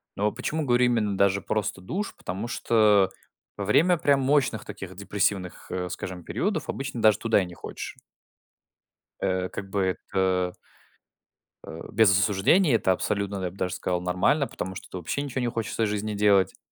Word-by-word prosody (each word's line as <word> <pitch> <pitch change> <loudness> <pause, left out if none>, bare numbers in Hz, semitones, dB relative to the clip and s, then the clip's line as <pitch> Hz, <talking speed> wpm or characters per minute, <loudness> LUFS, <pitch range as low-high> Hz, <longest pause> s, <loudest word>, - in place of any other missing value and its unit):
Но 105 +1 +1
почему 150 +5 -3
говорю 125 -1 +4
именно 110 -5 +1
даже 100 0 +3
просто 105 -3 -2
душ? 195 - -4
Потому 95 +6 -5
что 105 -5 +3 0.5
во 100 - -3
время 170 - +4
прям 140 -3 +3
мощных 135 -4 +1
таких 95 -1 -8
депрессивных, 100 -1 -2
э, 90 -1 -3
скажем, 90 0 -6
периодов 185 - -2
обычно 135 -3 -4
даже 110 -1 +5
туда 115 -3 +3
и - - -2
не 90 - -10
хочешь. - - -7 1.3
Э, 95 -1 0
как 95 - -7
бы 100 0 0 0.3
это. 95 -2 +1 1.1
Э, 80 - -8
без 110 -3 +5
осуждения, 105 - +3
это 95 - +2
абсолютно, 100 +1 -1
я 90 - -2
б 95 - -17
даже 90 -1 -2
сказал, 90 -1 -2
нормально, 90 +11 +1
потому 95 +1 -6
что - - -9
это - - -7
вообще 90 - -3
ничего 135 -2 -3
не 120 - 0
хочется 115 -1 -2
из 110 - +1
жизни 105 +1 -2
делать, 100 -2 +4
как - - -22
100 Hz, 175 wpm, -26 LUFS, 95-120 Hz, 1.3 s, даже